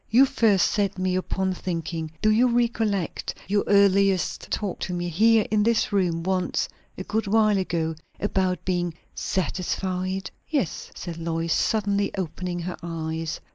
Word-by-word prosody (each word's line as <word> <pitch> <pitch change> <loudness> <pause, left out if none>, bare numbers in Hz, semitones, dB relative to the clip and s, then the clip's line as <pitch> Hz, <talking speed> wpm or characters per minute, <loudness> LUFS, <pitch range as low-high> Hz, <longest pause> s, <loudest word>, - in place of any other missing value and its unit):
"You 250 +5 +7
first 215 -8 +3
set 200 -3 0
me 185 0 0
upon 190 0 -1
thinking. 165 -3 -3
Do 215 - +5
you 235 +4 +4
recollect 225 -6 0
your 205 +2 +2
earliest 195 -2 +3
talk 200 -4 -2
to 180 - -3
me 175 0 -2
here 220 +5 +4
in 215 -1 +3
this 225 -1 +2
room 175 -4 +1
once, 185 -1 0 0.3
a 185 - -4
good 215 +2 -1
while 215 -1 +4
ago, 165 -3 -1 0.3
about 190 -2 0
being 175 -3 -1 0.2
satisfied?" 185 +1 -2 0.2
"Yes," 275 - -1
said 170 -2 -6
Lois, 165 0 -1
suddenly 205 -2 +1
opening 180 0 -3
her 180 +1 -4
eyes. 160 -1 -4
190 Hz, 145 wpm, -25 LUFS, 175-210 Hz, 0.3 s, You